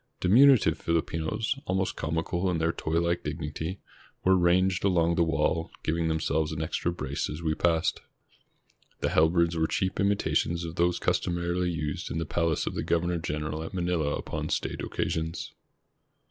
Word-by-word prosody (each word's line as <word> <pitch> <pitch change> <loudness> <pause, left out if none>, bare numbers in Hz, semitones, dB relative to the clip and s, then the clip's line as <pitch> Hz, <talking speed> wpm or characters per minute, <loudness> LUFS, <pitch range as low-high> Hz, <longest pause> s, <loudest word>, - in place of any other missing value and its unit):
Diminutive 110 - +5
Fihpinos, 85 +9 -1
almost 95 0 -1
comical 85 +3 -1
in 90 - 0
their 80 +1 +1
toy 80 0 -1
like 85 0 0
dignity, 80 +4 -4 0.4
were 95 +1 +5
ranged 90 +1 +3
along 85 -3 +3
the 85 - +1
wall, 80 0 0
giving 80 +1 0
themselves 80 -1 0
an 80 - -4
extra 80 +2 -1
brace 70 -5 -3
as 75 +3 -6
we 80 -1 +1
passed. 80 0 +1 1.0
The - - +1
halberds 85 +1 +3
were 80 -1 +1
cheap 95 +3 -1
imitations 100 -4 +1
of 80 - -5
those 85 +1 +2
customarily 85 +1 0
used 75 -3 -3
in - - -3
the 80 - -1
palace 80 0 0
of - - -3
the - - -2
governor 85 0 0
general 75 -1 -3
at 80 +4 -6
Manila 85 -5 0
upon - - -4
state - - -2
occasions. 80 +1 -3
85 Hz, 160 wpm, -28 LUFS, 80-90 Hz, 1.0 s, Diminutive